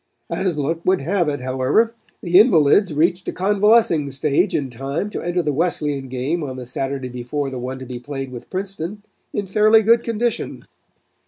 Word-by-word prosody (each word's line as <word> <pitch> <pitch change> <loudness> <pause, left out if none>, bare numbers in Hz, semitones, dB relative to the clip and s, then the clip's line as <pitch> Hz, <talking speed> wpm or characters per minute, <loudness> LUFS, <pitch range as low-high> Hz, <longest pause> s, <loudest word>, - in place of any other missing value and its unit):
As 180 -5 -1
luck 155 +3 -1
would 185 -3 +2
have 170 +2 0
it, 145 -3 -3
however, 130 - +1 0.3
the 180 0 +5
invalids 185 - +5
reached 170 +4 +1
a - - 0
convalescing 200 -5 +3
stage 145 +7 +1
in 135 -3 -2
time 140 - -4
to - - -4
enter 175 0 -1
the 150 -2 0
Wesleyan 145 -3 -1
game 130 +6 -2
on 130 -3 -5
the 130 -1 -7
Saturday 135 +1 -3
before 125 +3 -4
the 130 - -5
one 130 +2 -5
to 130 - -8
be 125 -1 -6
played 135 0 -6
with 120 -2 -9
Princeton 195 +1 -5 0.3
in 205 - -2
fairly 215 +3 +4
good 230 +2 +5
condition. 230 0 -2
155 Hz, 180 wpm, -21 LUFS, 135-195 Hz, 0.3 s, the